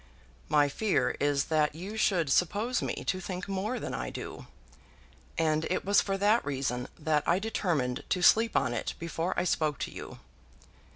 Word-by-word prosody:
"My 145 -1 +4
fear 200 +8 0
is 145 -1 +1
that 150 -1 +2
you 190 +6 -6
should 175 -9 +2
suppose 210 - +1
me - - -3
to 185 - 0
think 185 0 -5
more 200 +6 -2
than - - -5
I - - -3
do. - - -8 0.9
And 155 -1 +1
it 185 - -1
was 200 +1 +5
for 195 -1 -2
that 210 +4 +3
reason 130 -3 -2
that 155 -1 +1
I 170 - +4
determined 175 - -1
to 180 - 0
sleep 225 +4 +5
on 125 -3 +1
it - - -3
before 170 +1 -3
I - - +1
spoke 155 -5 0
to - - -4
you." - - -8
175 Hz, 175 wpm, -29 LUFS, 150-200 Hz, 0.9 s, was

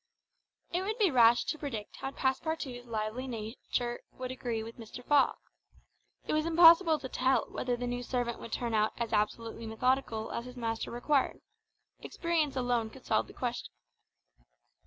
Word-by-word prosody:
It 355 - 0
would 425 +4 -2
be 410 -7 +3
rash 240 -2 +6
to 310 - -3
predict 230 -8 -5
how 270 - -4
Passepartout's 265 -2 -2
lively 220 +3 -3
nature 240 +1 -3
would 255 0 -5
agree 240 -3 -3
with 230 +2 -10
Mr. 235 +2 -9
Fogg. 290 -2 +4 0.9
It - - -1
was 310 +1 +1
impossible 335 0 +7
to 275 -3 -6
tell 260 +1 +2
whether 245 -1 -1
the 245 - -3
new 245 0 -2
servant 245 -1 -2
would 230 - -9
turn 235 -2 -2
out 215 0 +2
as 235 -2 -3
absolutely 225 +2 -1
methodical 225 -1 0
as 235 - -4
his 250 0 -10
master 225 -1 -2
required; 265 +3 0 0.6
experience 330 -5 -1
alone 245 -3 0
could 260 +3 -15
solve 110 -1 +1
the - - -13
question. - - -4
245 Hz, 160 wpm, -31 LUFS, 230-275 Hz, 0.9 s, impossible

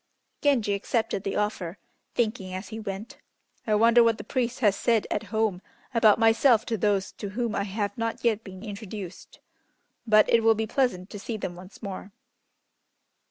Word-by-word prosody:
Genji 245 -8 +2
accepted 210 0 -1
the 195 - -2
offer, 205 -4 -2 0.4
thinking 215 -5 -1
as 190 +2 -6
he 220 0 -6
went, 210 +1 -6 0.5
"I 215 - +3
wonder 230 +2 +6
what 230 -1 +3
the - - -7
priest 250 -2 -2
has 205 -4 +4
said 230 -1 +2
at 210 - -1
home 220 -5 0 0.3
about 225 -3 +5
myself 225 +1 +4
to 230 - -1
those 200 -1 +1
to 205 - -7
whom 230 +2 -2
I 200 - -1
have 205 0 -3
not 230 0 -2
yet 225 -2 +1
been 190 0 -10
introduced. 205 -3 -8 0.7
But 215 -1 +6
it 230 - +4
will 225 0 +5
be 220 +1 -1
pleasant 215 -6 -1
to 205 - -7
see 220 +3 -4
them 180 -4 -5
once 185 +5 -13
more." 200 0 -6
215 Hz, 175 wpm, -26 LUFS, 200-230 Hz, 0.7 s, wonder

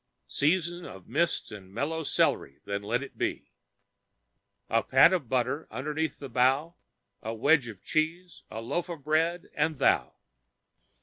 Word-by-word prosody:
Season 175 +3 +1
of 95 - -10
mists 170 0 0
and 95 -3 -10
mellow 155 +9 -2
celery, 70 - +1
then 100 0 -2
let 120 +6 -1
it 140 - -12
be. - - -2 1.2
A 115 - +2
pat 135 +10 +6
of 155 -11 -1
butter 130 +4 0
underneath 150 +7 -2
the 140 - -7
bough, 135 +6 +2 0.5
a 110 +1 -4
wedge 140 +2 +3
of 105 -5 -10
cheese, 165 +3 -1
a 110 - -6
loaf 175 +10 -2
of 165 -5 -7
bread 165 +4 0
and 155 -2 0
Thou. - - +2
140 Hz, 145 wpm, -28 LUFS, 115-160 Hz, 1.2 s, pat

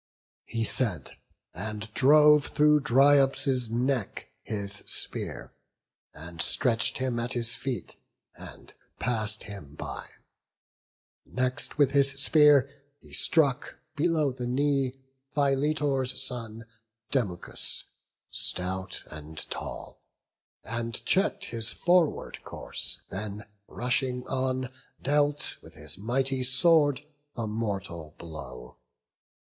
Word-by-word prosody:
He 115 -1 -2
said, 105 - +3 0.4
and 105 +4 -6
drove 150 +3 +5
through 150 0 +3
Dryops' 135 -2 +3
neck 125 -1 -2
his 100 -1 -1
spear, - - -2 0.6
And 85 +2 -6
stretch'd 120 +6 +3
him 130 -2 -2
at 120 +1 +1
his 120 -1 +3
feet, 130 -6 -4 0.4
and - - -12 0.2
pass'd 110 -3 0
him 85 -9 -9
by. - - -7 1.2
Next 130 +3 -1
with 145 -2 +3
his 140 -1 +4
spear 145 -1 +5 0.3
he - - -18
struck 145 -4 +2 0.2
below 155 -2 0
the 125 -1 -6
knee 135 0 -1 0.4
Philetor's 140 -2 0
son, 115 -4 -2 0.5
Demuchus, 100 -10 -2 0.5
stout 95 +1 0
and 75 +1 -7
tall, - - -7 0.6
And 115 -1 -4
check'd 200 +1 +2
his 115 - -1
forward 175 -3 0
course; - - -2
then 105 +2 -5 0.2
rushing 125 +1 -1
on 130 -1 -3 0.3
Dealt 145 +1 0
with - - -15
his - - -3
mighty 130 +4 -1
sword 145 +2 +5 0.3
the 115 - -3
mortal 100 -8 -5
blow. 60 -7 -10
125 Hz, 100 wpm, -27 LUFS, 110-140 Hz, 1.2 s, drove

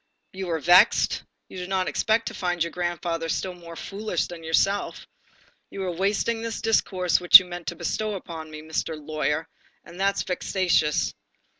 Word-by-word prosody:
You 190 -1 -5
are 165 - 0
vexed? 175 +4 +4 0.3
You - - -11
did 180 0 -6
not 190 -1 0
expect 225 +1 +1
to - - -4
find 175 -2 -1
your 170 - -4
grandfather 175 -1 -3
still 185 +3 -2
more 170 -1 -11
foolish 200 0 -3
than 170 -2 -10
yourself, 195 +5 0 0.6
you 195 - -6
are 185 - -2
wasting 200 +5 0
the 230 - -3
discourse 185 -6 +1
which 175 - +11
you 185 - -2
meant 175 -1 -8
to 175 - -3
bestow 215 +5 -2
upon 165 -4 -8
me, 155 0 -9
Mr. 160 0 -3
Lawyer, 155 +1 -2 0.4
and 175 +2 -12
that's 195 +1 +1
vexatious. 180 -4 0
180 Hz, 170 wpm, -25 LUFS, 165-195 Hz, 0.6 s, which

